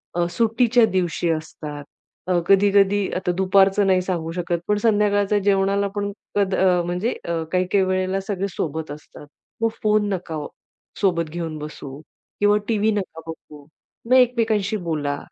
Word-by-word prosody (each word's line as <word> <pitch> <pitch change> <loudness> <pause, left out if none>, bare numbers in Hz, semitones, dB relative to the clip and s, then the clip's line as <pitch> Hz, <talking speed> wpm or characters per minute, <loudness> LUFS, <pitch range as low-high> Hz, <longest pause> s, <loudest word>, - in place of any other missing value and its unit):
अ, 175 0 +1
सुट्टीच्या 230 +1 +3
दिवशी 175 -2 0
असतात. 150 -2 -6 0.4
अ, 180 -1 +2
कधी-कधी 200 0 +4
आता 180 -1 -1
दुपारचं 195 +1 +3
नाही 185 -1 +3
सांगू 170 -3 -3
शकत, 175 0 -2
पण 210 - +2
संध्याकाळच्या 205 -1 +2
जेवणाला 200 0 +1
पण 205 0 -2 0.2
कद 200 -2 +1
अ, 180 -2 +3
म्हणजे 180 +7 -1
अ, 165 -1 -2
काही-काही 185 +1 +2
वेळेला 185 +1 0
सगळे 195 0 -3
सोबत 160 -1 -3
असतात, 150 0 -11 0.3
मग 225 - +3
फोन 210 -1 +2
नका, 160 -5 -4 0.6
सोबत 170 -5 +1
घेऊन 165 -2 -4
बसू 145 -2 -8 0.4
किंवा 205 0 +4
टीव्ही 220 -1 +1
नका 190 -6 -4
बघू. 150 -2 -10 0.4
मग 245 - +1
एकमेकांशी 225 -5 +2
बोला, 155 -6 -2
190 Hz, 145 wpm, -22 LUFS, 170-205 Hz, 0.6 s, कधी-कधी